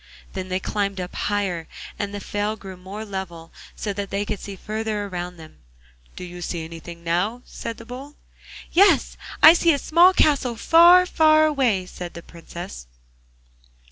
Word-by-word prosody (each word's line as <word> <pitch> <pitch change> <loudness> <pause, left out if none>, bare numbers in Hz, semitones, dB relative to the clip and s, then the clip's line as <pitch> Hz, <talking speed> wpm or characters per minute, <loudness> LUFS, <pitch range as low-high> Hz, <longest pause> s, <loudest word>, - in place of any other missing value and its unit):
Then 185 -1 -5
they 185 0 -1
climbed 200 0 -2
up 180 0 -5
higher, 195 -5 -2 0.3
and 205 -1 -2
the 205 - -5
fell 205 +2 -2
grew 195 -3 -10
more 195 +4 -8
level, 180 -5 -7 0.2
so 205 - -4
that 200 0 -5
they 200 +1 -2
could 205 - -4
see 200 - -8
farther 215 +1 -3
around 180 -2 -6
them. 160 -1 -14 0.6
'Do - - -8
you 175 0 -9
see 170 -2 -4
anything 170 +1 -10
now?' 190 +9 -1
said 230 - -7
the 230 - -12
Bull. 265 +5 -9 0.6
'Yes, 395 +4 +4 0.3
I 315 - +11
see 335 -1 +3
a - - 0
small 340 +6 +5
castle, 280 -9 +2
far, 345 +8 +6
far 310 -3 +4
away,' 255 -11 +1
said 180 -1 -9
the 170 - -9
Princess. 165 - -10
200 Hz, 170 wpm, -23 LUFS, 180-245 Hz, 0.6 s, I